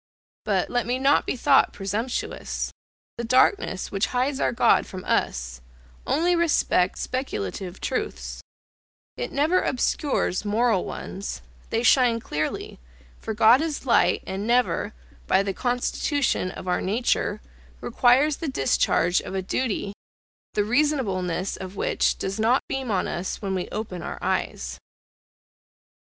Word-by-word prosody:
But, - - 0
let 245 -2 0
me 250 +1 0
not 275 +2 +3
be - - 0
thought 270 +2 +4
presumptuous, 210 +6 -3 0.5
the - - -1
darkness 255 - +2
which 195 +1 0
hides 265 +2 0
our - - +2
God 240 - +3
from 185 -1 -8
us, 60 +1 -1 0.5
only 350 +3 +2
respects 300 - +2
speculative 190 - -4
truths - - -3 0.7
it - - -4
never 310 +6 +2
obscures 255 - 0
moral 215 -1 +1
ones, 195 +1 -6 0.3
they 230 +1 0
shine 245 -1 +4
clearly, 155 - -4 0.4
for 220 - -4
God 230 +5 +6
is 315 -4 -3
light, 245 - +3
and 195 +3 -4
never, 235 -3 +1 0.3
by 190 +1 +3
the 195 -1 -2
constitution 245 0 0
of 185 - -9
our 180 - +1
nature, 215 0 0 0.4
requires 260 +5 +3
the 325 - -4
discharge 175 - +2
of - - -7
a 190 - -1
duty, 205 -1 -2 0.6
the 210 - +3
reasonableness 205 - 0
of 190 +1 -8
which - - +1
does 195 +2 -3
not 235 +4 +3
beam 265 -2 -3
on 195 -4 0
us 175 +2 -3
when 195 -2 -3
we 185 -1 -3
open 205 -5 -5
our - - -5
eyes. 60 +1 -2
225 Hz, 135 wpm, -25 LUFS, 190-260 Hz, 0.7 s, God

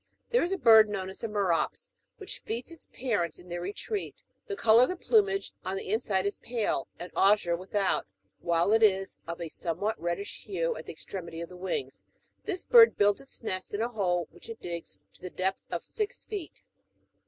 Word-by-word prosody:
There 485 - +4
is 350 - 0
a 390 - +1
bird, 220 - +7
known 190 -2 -3
as - - -11
the 230 - -3
''merops,''" 205 - 0 0.3
which 395 -2 -7
feeds 235 +7 -5
its 330 - -14
pai'ents 205 -10 -1
in 175 - -15
their 175 0 -4
retreat: 205 - -4 0.3
the 405 - -3
colour 230 - +6
of 255 - +5
the 365 - -1
plumage 395 0 +2
on 190 +1 -2
the 195 - -3
inside 200 -4 +1
is 200 - -1
pale, 235 -2 -1
and 175 - -8
azure 195 -3 +4
without, 190 +2 0 0.3
while 170 +4 +2
it 225 - +4
is 195 -3 +3
of 170 +1 -5
a 170 - -4
somewhat 190 +8 -2
reddish 175 +4 -3
hue 170 -5 -1
at 160 - -9
the - - -4
extremity 165 +1 -7
of 170 - -5
the 180 - -11
wings: 190 - -4 0.4
this 375 -4 -2
bird 470 -2 +7
builds 205 0 +3
its 270 -3 -8
nest 185 -2 -3
in 205 - -1
a 235 - -1
hole 180 -7 0
which - - -15
it 230 - -7
digs 170 -1 -6 0.2
to - - -23
the 180 - -5
depth 190 +2 -2
of - - -4
six 425 -2 -4
feet. 395 -7 -7
205 Hz, 205 wpm, -29 LUFS, 180-245 Hz, 0.4 s, bird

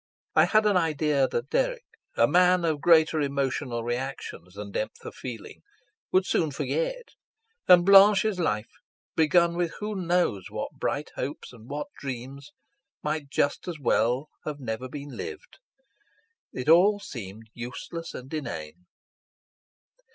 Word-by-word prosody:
I - - +6
had 215 0 +3
an 205 -3 +4
idea 150 -4 +2
that 120 +2 -4
Dirk, - - 0 0.3
a - - +5
man 180 0 +4
of 155 -3 0
greater 160 -1 +5
emotional 140 -3 -1
reactions 120 -7 -5
than 100 0 -7
depth 110 - -4
of - - -7
feeling, 120 -4 -8 0.5
would 185 0 +3
soon 160 -4 +1
forget; - - -3 0.6
and 175 -1 +7
Blanche's 200 0 +6
life, 105 -10 -1 0.4
begun 170 +2 +3
with 175 -1 -1
who 210 +1 -3
knows 175 - 0
what - - -4
bright 145 - -3
hopes 140 0 -5
and 115 -1 -14
what 145 +1 -3
dreams, 135 +2 -7 0.5
might 150 -2 -2
just 145 +3 0
as 175 -3 -4
well 125 +2 +1
have 150 -1 -5
never 125 0 -4
been 145 +2 -7
lived. 440 +1 -8 0.9
It 125 - -6
all 190 +6 +6
seemed 110 - -8
useless 125 +7 -7
and 130 +4 -9
inane. 90 - -6
150 Hz, 135 wpm, -27 LUFS, 125-180 Hz, 0.9 s, and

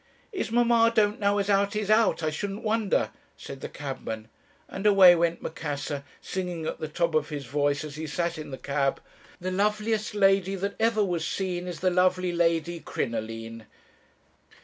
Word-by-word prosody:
"'Is 380 - -3
mamma 235 -1 +4
don't 210 -1 +3
know 200 0 +2
as 200 -1 0
'ow 200 0 +3
'e's 210 -1 -2
hout, 215 -6 +3
I 155 - +1
shouldn't 200 +7 -4
vonder,' 220 -2 +1 0.3
said 135 -1 -9
the - - -5
cabman 115 -6 -6 0.4
and 195 +2 -2
away 195 -3 +8
went 170 0 0
Macassar, 145 -2 -4 0.2
singing 180 -3 -4
at - - -4
the 155 - -3
top 170 +2 -1
of 155 0 +1
his 145 -3 -5
voice 145 +1 0
as 150 -1 -8
he 160 0 -4
sat 170 +2 -2
in 155 - -7
the 130 - -6
cab 140 +1 -1 0.4
'The 185 +1 -3
loveliest 210 +2 0
lady 195 -1 +3
that 200 +1 -3
ever 220 -1 +3
was 175 -3 -2
seen 180 -2 -3
Is 175 -2 -6
the 185 0 +2
lovely 180 0 +2
Lady 170 0 +1
Crinoline.' 115 -3 -5
175 Hz, 175 wpm, -27 LUFS, 150-200 Hz, 0.4 s, away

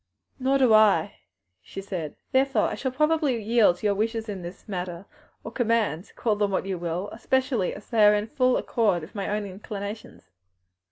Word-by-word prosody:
"Nor 265 +1 +2
do 255 -4 +4
I," 210 -7 +4 0.4
she 145 - -9
said, 180 -6 -5 0.2
"therefore 270 0 +2
shall 260 - -3
probably 305 -2 +1
yield 220 -3 +3
to 215 - -8
your 205 - +3
wishes 225 +2 -2
in 200 -3 -5
this 175 +2 -10
matter 180 -2 -5 0.4
or - - -7
commands, 225 - 0
call 220 -3 0
them 205 -1 0
what 190 -1 -1
you 190 -2 -3
will; 175 +3 -3
especially 250 -3 0
as 205 - -12
they 225 -2 +4
are 210 0 +7
in 210 0 -1
full 255 +1 +1
accord 205 -8 0
with 155 - -11
my 200 -2 -3
own 210 0 -1
inclinations." 200 - -8
210 Hz, 180 wpm, -25 LUFS, 190-240 Hz, 0.4 s, are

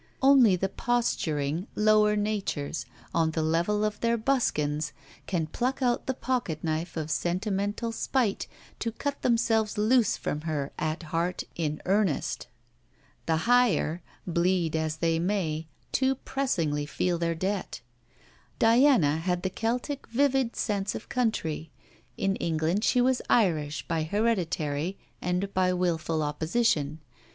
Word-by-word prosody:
Only 265 -8 +7
the 190 +2 0
posturing 175 -8 -1
lower 210 0 +4
natures, 205 -8 -2 0.3
on 165 -1 +2
the 160 0 -1
level 175 +7 +1
of 210 -1 -2
their 235 0 +1
buskins, 155 - 0 0.3
can 175 -4 0
pluck 255 - -2
out 245 -1 +1
the 265 - 0
pocket 240 - -2
knife 160 +1 -2
of 155 -1 -3
sentimental 200 +7 -1
spite 225 -2 0 0.3
to 230 - -1
cut 280 +5 -4
themselves 225 -3 +2
loose 220 +1 +3
from 150 - -3
her 150 -3 -2
at 155 +2 -2
heart 175 +2 0
in 155 -2 -2
earnest. 195 -5 0 0.8
The 165 - +3
higher, 240 -9 +3 0.2
bleed 170 -1 +1
as 160 -1 -1
they 165 0 +1
may, 165 -4 -1 0.2
too 265 0 +2
pressingly 165 - -1
feel 175 +2 -1
their 170 -1 0
debt. 190 -4 -3 0.8
Diana 225 - +5
had 180 +2 -1
the 190 - -1
Celtic 245 +7 -2
vivid 265 -1 +1
sense 205 -2 -1
of - - -7
country. 165 -10 -1 0.5
In 195 0 0
England 165 +5 0
she 250 - +3
was 255 0 +2
Irish, 160 -9 +1
by 165 - 0
hereditary, 170 -4 -1 0.2
and 180 +2 -1
by 185 -1 +2
wilful 165 -3 0
opposition. 155 0 0
185 Hz, 130 wpm, -28 LUFS, 160-230 Hz, 0.8 s, Only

